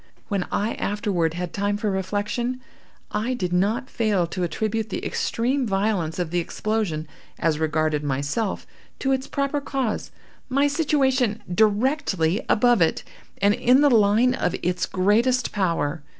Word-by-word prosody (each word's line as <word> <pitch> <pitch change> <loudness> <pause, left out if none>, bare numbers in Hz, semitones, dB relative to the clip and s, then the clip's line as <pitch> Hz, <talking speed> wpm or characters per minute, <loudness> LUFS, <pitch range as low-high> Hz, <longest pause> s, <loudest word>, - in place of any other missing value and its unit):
When 200 -4 -1
I 215 +3 0
afterward 185 -5 -1
had 175 -1 -4
time 205 0 0
for 210 0 -1
reflection, 205 +6 -2 0.5
I 240 +4 -1
did 180 -7 -2
not 215 +8 +1
fail 210 -8 +1
to 180 +2 -5
attribute 215 +5 -1
the - - -4
extreme 255 +2 0
violence 195 -5 0
of 175 -3 -2
the 175 - +1
explosion, 175 -3 -2 0.3
as 160 -2 0
regarded 155 -1 0
myself, 145 - -2 0.3
to 270 - -1
its 265 0 0
proper 280 +1 -1
cause—my 270 +1 -3
situation 270 -7 +1
directly 210 - +1
above 240 -2 +4
it, 165 - +2 0.4
and 200 +1 +5
in 250 +5 +4
the 290 -1 +5
line 225 +3 +4
of 240 - -1
its 180 +1 0
greatest 230 +7 +2
power. 165 -6 -1
210 Hz, 140 wpm, -24 LUFS, 180-245 Hz, 0.5 s, and